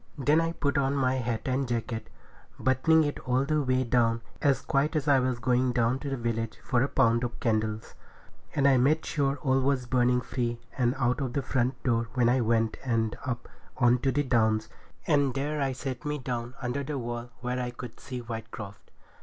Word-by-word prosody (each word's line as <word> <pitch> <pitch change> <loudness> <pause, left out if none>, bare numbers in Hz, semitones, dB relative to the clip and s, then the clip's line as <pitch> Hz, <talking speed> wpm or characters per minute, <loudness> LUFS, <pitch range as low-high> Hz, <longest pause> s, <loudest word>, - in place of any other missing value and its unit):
Then 145 +4 +3
I 165 0 -1
put 140 -2 0
on 135 0 +1
my 130 -2 +2
hat 115 -3 -2
and 130 +1 0
jacket, 115 -1 -3 0.5
buttoning 155 +5 +4
it 145 -1 -2
all 130 +2 0
the 155 +1 +1
way 130 -1 +1
down, 115 -2 +2 0.2
as 140 -2 +3
quiet 140 +3 +1
as 155 - +1
if 150 - -1
I 140 -2 +6
was 125 -1 0
going 125 +1 +1
down 120 +1 +1
to 140 - -5
the 135 - -2
village 115 -1 -2
for 125 -2 +1
a 135 - +2
pound 115 -2 +2
of 120 -1 -4
candles. 110 -1 -1 0.6
And 140 -2 +4
I 135 -2 +5
made 145 +6 +3
sure 140 -2 0
all 135 -1 +3
was 130 -1 +1
burning 125 0 +2
free, 120 -1 -2 0.2
and 125 -1 +1
out 125 +1 +1
of 130 -3 -2
the 140 - -1
front 125 -1 -1
door 115 -2 +1
I 125 +1 +4
went 115 -1 +1
and 115 -4 0
up 120 -2 -3 0.3
on 120 -1 +4
to 135 +2 +1
the 145 +3 +1
Downs, 110 -4 +2 0.4
and 145 -4 +2
there 145 +2 -1
I 135 -1 +1
set 130 -1 -5
me 150 0 -2
down 125 -2 -4
under 125 +3 -1
the 145 +1 -3
wall 120 -1 -4
where 125 +1 -2
I 125 - -2
could 120 -1 -9
see 125 -2 -6
Whitecroft. 110 -3 -8
125 Hz, 205 wpm, -28 LUFS, 120-135 Hz, 0.6 s, I